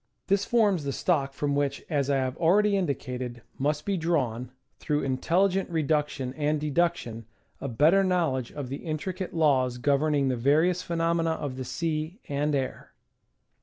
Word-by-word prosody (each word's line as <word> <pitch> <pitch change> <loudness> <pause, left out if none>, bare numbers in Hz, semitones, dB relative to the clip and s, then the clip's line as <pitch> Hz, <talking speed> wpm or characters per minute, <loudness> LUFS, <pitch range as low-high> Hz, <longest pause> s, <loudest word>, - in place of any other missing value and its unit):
This 200 0 +1
forms 205 -8 +2
the 140 -1 -2
stock 140 -5 +1
from 145 +1 -1
which, 140 -1 -1
as 145 -3 0
I 140 - +3
have 130 -1 -1
already 200 +5 +3
indicated, 125 -8 -3 0.2
must 150 +2 0
be 200 -2 0
drawn, 130 -8 -1 0.3
through 150 -1 -1
intelligent 180 +9 +1
reduction 150 -5 -1
and 150 +1 0
deduction, 145 -7 -1 0.3
a - - -4
better 155 +11 +4
knowledge 165 -10 0
of 140 -4 -6
the 135 - -4
intricate 175 +5 -4
laws 130 -6 +2
governing 140 +2 +2
the 130 - +1
various 155 +9 +2
phenomena 165 -1 0
of 145 -4 -4
the 130 0 -5
sea 155 - -3
and 145 +1 0
air. 135 -2 -4
150 Hz, 155 wpm, -27 LUFS, 135-170 Hz, 0.3 s, better